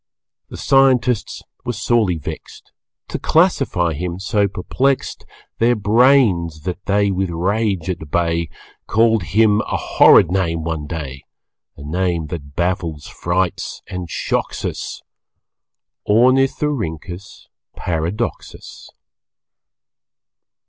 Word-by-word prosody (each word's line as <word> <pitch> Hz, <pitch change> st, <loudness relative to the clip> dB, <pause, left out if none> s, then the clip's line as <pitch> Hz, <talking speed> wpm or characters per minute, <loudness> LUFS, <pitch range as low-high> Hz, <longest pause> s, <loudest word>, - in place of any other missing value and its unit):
The -, -, -8 dB
scientists 130 Hz, -4 st, +2 dB, 0.2 s
were 120 Hz, -, -3 dB
sorely 110 Hz, -4 st, +1 dB
vexed, 75 Hz, -, -9 dB, 0.4 s
To -, -, -4 dB
classify 85 Hz, -2 st, +2 dB
him 85 Hz, +3 st, -4 dB
so 100 Hz, +1 st, +1 dB
perplexed 130 Hz, +8 st, -2 dB, 0.3 s
Their 120 Hz, +1 st, +3 dB
brains 105 Hz, -, +3 dB
that 90 Hz, +3 st, -5 dB
they 100 Hz, 0 st, +2 dB
with 95 Hz, 0 st, -1 dB
rage 95 Hz, +1 st, -1 dB
at 85 Hz, -5 st, -4 dB
bay 85 Hz, 0 st, 0 dB, 0.4 s
Called 115 Hz, 0 st, +3 dB
him 105 Hz, +5 st, +3 dB
a -, -, -2 dB
horrid -, -, +5 dB
name 85 Hz, -4 st, 0 dB
one 80 Hz, -2 st, -3 dB
day, 70 Hz, -5 st, -6 dB, 0.5 s
A 70 Hz, -, -10 dB
name 85 Hz, +1 st, -1 dB
that 70 Hz, -4 st, -8 dB
baffles, 85 Hz, -4 st, -2 dB
frights 90 Hz, +1 st, -2 dB
and 90 Hz, -2 st, -6 dB
shocks -, -, -2 dB
us -, -, -5 dB, 1.1 s
Ornithorynchus 115 Hz, -, 0 dB, 0.3 s
Paradoxus. 90 Hz, +7 st, -4 dB
95 Hz, 100 wpm, -19 LUFS, 85-110 Hz, 1.1 s, horrid